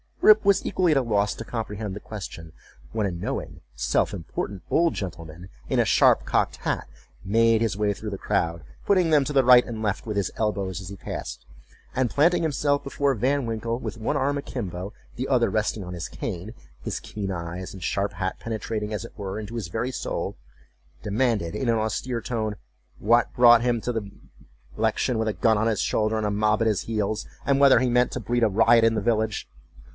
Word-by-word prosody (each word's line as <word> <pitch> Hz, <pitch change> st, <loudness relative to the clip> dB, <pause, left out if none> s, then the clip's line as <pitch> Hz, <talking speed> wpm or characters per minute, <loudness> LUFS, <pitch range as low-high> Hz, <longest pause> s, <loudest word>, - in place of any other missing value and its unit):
Rip 215 Hz, 0 st, +7 dB
was 200 Hz, -1 st, +4 dB
equally 180 Hz, -3 st, +2 dB
at -, -, +2 dB
a -, -, +4 dB
loss 105 Hz, -3 st, +1 dB
to -, -, -6 dB
comprehend 105 Hz, -3 st, -4 dB
the -, -, -6 dB
question; 85 Hz, -7 st, -8 dB, 0.4 s
when 110 Hz, -, -1 dB
a 95 Hz, -, -1 dB
knowing, 85 Hz, 0 st, -5 dB
self -, -, +1 dB
important 100 Hz, -2 st, -5 dB
old 170 Hz, -1 st, +3 dB
gentleman, 85 Hz, -1 st, -7 dB, 0.2 s
in -, -, 0 dB
a -, -, +4 dB
sharp -, -, +4 dB
cocked -, -, 0 dB
hat, -, -, -2 dB, 0.4 s
made 115 Hz, +2 st, +3 dB
his 115 Hz, -4 st, 0 dB
way 105 Hz, -1 st, +1 dB
through 105 Hz, +1 st, -6 dB
the 100 Hz, -, -4 dB
crowd, 85 Hz, -3 st, -1 dB, 0.2 s
putting 185 Hz, -4 st, +3 dB
them 150 Hz, -3 st, +5 dB
to 145 Hz, -, -3 dB
the 135 Hz, -1 st, +4 dB
right 125 Hz, 0 st, +7 dB
and 110 Hz, -2 st, -5 dB
left 100 Hz, -2 st, -1 dB
with 105 Hz, -2 st, -2 dB
his 100 Hz, -4 st, 0 dB
elbows 100 Hz, -4 st, -1 dB
as 95 Hz, -1 st, -8 dB
he 100 Hz, -, -7 dB
passed, -, -, -7 dB, 0.5 s
and 130 Hz, -2 st, +1 dB
planting 165 Hz, +8 st, +3 dB
himself 145 Hz, -2 st, +1 dB
before 140 Hz, 0 st, 0 dB
Van 130 Hz, +4 st, 0 dB
Winkle, 115 Hz, +1 st, -2 dB
with 120 Hz, -, -5 dB
one 110 Hz, -, -1 dB
arm 140 Hz, +2 st, +1 dB
akimbo, 100 Hz, -9 st, -5 dB, 0.3 s
the 130 Hz, +2 st, -2 dB
other 125 Hz, -3 st, +3 dB
resting 110 Hz, -1 st, -1 dB
on 90 Hz, 0 st, -7 dB
his 85 Hz, -1 st, -5 dB
cane, 100 Hz, +1 st, -6 dB, 0.3 s
his -, -, -3 dB
keen 100 Hz, -2 st, -5 dB
eyes 85 Hz, +1 st, -5 dB
and 95 Hz, -3 st, -9 dB
sharp 100 Hz, +3 st, -1 dB
hat 95 Hz, +2 st, -3 dB
penetrating, 110 Hz, -1 st, -4 dB
as 105 Hz, +2 st, -3 dB
it -, -, -12 dB
were, 100 Hz, 0 st, -4 dB
into 110 Hz, +2 st, -7 dB
his 110 Hz, -6 st, -3 dB
very 115 Hz, +8 st, -2 dB
soul, -, -, -3 dB, 0.7 s
demanded 105 Hz, -5 st, 0 dB
in 130 Hz, -3 st, -1 dB
an 115 Hz, -, +3 dB
austere 115 Hz, +3 st, -2 dB
tone, 110 Hz, -3 st, -2 dB, 0.4 s
"what 120 Hz, +2 st, +3 dB
brought 120 Hz, -1 st, +7 dB
him 120 Hz, -2 st, +1 dB
to 125 Hz, -, -2 dB
the 110 Hz, -4 st, -4 dB, 0.7 s
election 110 Hz, +2 st, +1 dB
with 110 Hz, -, 0 dB
a 110 Hz, -, 0 dB
gun 110 Hz, 0 st, +2 dB
on 110 Hz, +2 st, +1 dB
his 110 Hz, -2 st, +1 dB
shoulder, 110 Hz, 0 st, +1 dB
and 110 Hz, -, -1 dB
a 105 Hz, -, 0 dB
mob 105 Hz, +1 st, +1 dB
at 115 Hz, -, +3 dB
his 105 Hz, -4 st, +1 dB
heels, 110 Hz, -1 st, -2 dB, 0.2 s
and 140 Hz, 0 st, +2 dB
whether 140 Hz, -3 st, +7 dB
he 130 Hz, 0 st, +1 dB
meant 125 Hz, +1 st, +3 dB
to -, -, -3 dB
breed 120 Hz, 0 st, 0 dB
a 110 Hz, -, +4 dB
riot 115 Hz, +3 st, +5 dB
in 115 Hz, 0 st, +4 dB
the 105 Hz, -, 0 dB
village?" 110 Hz, -1 st, 0 dB
110 Hz, 210 wpm, -25 LUFS, 100-120 Hz, 0.7 s, Rip